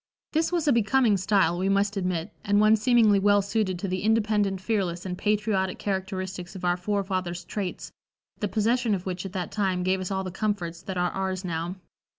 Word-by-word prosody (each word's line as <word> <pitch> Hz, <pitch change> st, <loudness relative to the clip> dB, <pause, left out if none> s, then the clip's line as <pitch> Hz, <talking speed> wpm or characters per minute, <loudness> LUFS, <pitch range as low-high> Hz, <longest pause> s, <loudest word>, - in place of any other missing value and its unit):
This 320 Hz, +2 st, +1 dB
was 340 Hz, -3 st, 0 dB
a 285 Hz, -, +5 dB
becoming 235 Hz, 0 st, +3 dB
style 190 Hz, -3 st, +2 dB
we 190 Hz, +1 st, +1 dB
must 200 Hz, +1 st, +2 dB
admit, 180 Hz, -1 st, -2 dB
and 205 Hz, -1 st, +3 dB
one 215 Hz, +1 st, +6 dB
seemingly 220 Hz, -2 st, +4 dB
well 205 Hz, 0 st, +4 dB
suited 200 Hz, -2 st, -1 dB
to 195 Hz, -, -4 dB
the 185 Hz, 0 st, -2 dB
independent, 210 Hz, -3 st, +1 dB
fearless 190 Hz, -4 st, -1 dB
and 180 Hz, -1 st, -3 dB
patriotic 205 Hz, -2 st, 0 dB
characteristics 190 Hz, -2 st, -4 dB
of 180 Hz, -, -5 dB
our 175 Hz, 0 st, +3 dB
forefathers' 185 Hz, -2 st, -2 dB
traits, 195 Hz, -2 st, -5 dB, 0.5 s
the 210 Hz, -, 0 dB
possession 225 Hz, +1 st, +1 dB
of 185 Hz, -, -6 dB
which 185 Hz, 0 st, -3 dB
at 190 Hz, -, -12 dB
that 180 Hz, -3 st, -3 dB
time 190 Hz, -3 st, 0 dB
gave 185 Hz, +1 st, +1 dB
us 185 Hz, -, -3 dB
all 190 Hz, -1 st, -1 dB
the 185 Hz, -, -5 dB
comforts 185 Hz, -4 st, -2 dB
that 190 Hz, -1 st, -5 dB
are 180 Hz, 0 st, +1 dB
ours 190 Hz, -1 st, -3 dB
now. 170 Hz, +1 st, -3 dB
195 Hz, 195 wpm, -26 LUFS, 185-210 Hz, 0.5 s, one